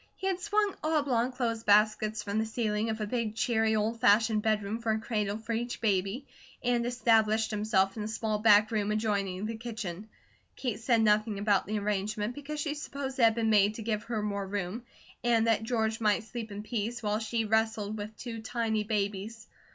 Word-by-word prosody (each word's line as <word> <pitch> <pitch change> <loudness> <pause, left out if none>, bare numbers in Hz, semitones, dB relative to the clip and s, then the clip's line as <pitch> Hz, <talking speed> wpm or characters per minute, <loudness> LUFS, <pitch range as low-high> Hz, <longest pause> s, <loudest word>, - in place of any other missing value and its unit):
He 380 - -7
had 380 -2 0
swung 415 +1 +1
oblong 280 -6 +1
clothes 235 -3 -2
baskets 215 0 +3
from 205 +1 -1
the 220 - +1
ceiling 220 -1 -1
of 220 0 -2
a 215 - -1
big, 220 -1 -2
cheery, 220 -2 +1
old 220 +2 -1
fashioned 215 +1 +4
bedroom 215 0 0
for 230 -1 0
a 220 - -1
cradle 210 -2 -2
for 225 +1 -5
each 240 +2 -3
baby, 200 +4 0 0.4
and 240 -1 +1
established 225 -2 +2
himself 205 -2 +1
in 220 - -5
a 210 - -3
small 220 -1 -2
back 210 0 +5
room 210 -2 0
adjoining 200 -3 -1
the 225 +1 -3
kitchen. 220 -4 -6 0.5
Kate 240 -6 -3
said 230 -1 +2
nothing 215 0 +2
about 200 -2 +1
the 215 +1 -1
arrangement, 210 +2 -1
because 290 +2 -6
she 295 0 -1
supposed 280 -2 -5
it - - +4
had 225 -1 +4
been 225 -1 +1
made 205 0 +4
to 225 - -6
give 215 -1 -2
her 225 -3 -2
more 200 -2 -2
room, 200 +3 -3 0.4
and 230 -2 +3
that 225 -1 +2
George 225 -1 -1
might 215 +1 +2
sleep 225 -1 -7
in 205 +1 -6
peace, 230 +1 -3
while 210 0 0
she 225 0 -1
wrestled 220 -1 0
with 215 +1 -7
two 230 -2 -6
tiny 220 -1 -1
babies. 210 +1 -3
220 Hz, 195 wpm, -30 LUFS, 210-230 Hz, 0.5 s, back